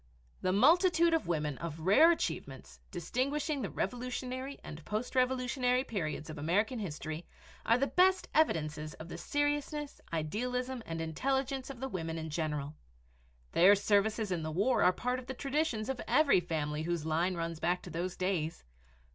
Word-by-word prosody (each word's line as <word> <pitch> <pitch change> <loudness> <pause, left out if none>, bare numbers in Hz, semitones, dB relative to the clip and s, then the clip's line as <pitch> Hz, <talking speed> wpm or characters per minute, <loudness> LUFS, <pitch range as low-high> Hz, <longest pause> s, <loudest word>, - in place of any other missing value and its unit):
The 185 - +1
multitude 335 - +5
of 325 - +1
women 150 -5 -1
of 165 -1 -5
rare 205 - +6
achievements, 340 - -4
distinguishing 275 - -1
the 205 - -2
Revolutionary 255 +4 -3
and 155 +1 -9
post 215 +7 -3
Revolutionary 255 0 +2
periods 165 - -3
of 155 -1 -7
American 205 - +1
history 160 -3 -5 0.4
are 230 - +5
the 270 - +2
best 370 +5 +3
evidences 155 - +1
of 160 +2 -10
the - - -6
seriousness, 290 0 -1
idealism, 250 +10 -2
and 165 0 -3
intelligence 265 - -1
of 270 -3 -8
the 265 - -1
women 165 -8 -4
in 160 -1 -5
general. 150 -2 -2 0.8
Their 190 +4 +7
services 205 +1 +1
in 175 -2 0
the 155 - -3
war 200 +11 +2
are 180 - +6
part 250 +7 -2
of 255 - -12
the 260 - -5
traditions 275 -5 -1
of 265 -2 -3
every 295 -10 +5
family 155 -3 -2
whose 170 -1 -2
line 170 +4 +1
runs 165 -1 -3
back 175 +2 0
to - - -8
those 175 +3 -3
days. 180 -4 -1
205 Hz, 165 wpm, -32 LUFS, 165-260 Hz, 0.8 s, Their